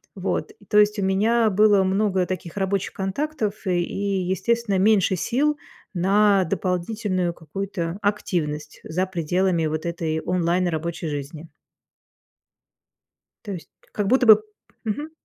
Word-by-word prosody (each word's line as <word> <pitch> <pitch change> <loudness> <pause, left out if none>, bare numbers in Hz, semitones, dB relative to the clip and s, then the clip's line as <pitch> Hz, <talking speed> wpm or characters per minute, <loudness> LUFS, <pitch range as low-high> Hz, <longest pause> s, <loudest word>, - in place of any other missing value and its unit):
Вот. - - -2 0.2
То 210 - +2
есть, 210 0 +4
у - - 0
меня 220 +4 +3
было 205 0 +4
много 190 -1 +1
таких 180 -2 -5
рабочих 195 0 -1
контактов, 215 +2 -2
э, 180 -2 +1
и, 195 +2 -1
естественно, 200 +3 0
меньше 195 -1 +3
сил 285 - 0 0.4
на 195 +2 +4
дополнительную 185 0 -1
какую-то 170 +2 -5
активность 155 -7 -2
за 185 +4 -1
пределами, 175 0 0
вот, 155 +1 -2
этой 160 -2 -2
онлайн 180 +1 +1
рабочей 165 0 -3
жизни. 150 +3 -6 2.0
То 205 - -5
есть 175 - -9 0.2
как 205 -2 -2
будто 255 +3 +3
бы 215 -2 +8 0.4
Мгм. 290 +8 -3
190 Hz, 125 wpm, -23 LUFS, 170-210 Hz, 2.0 s, бы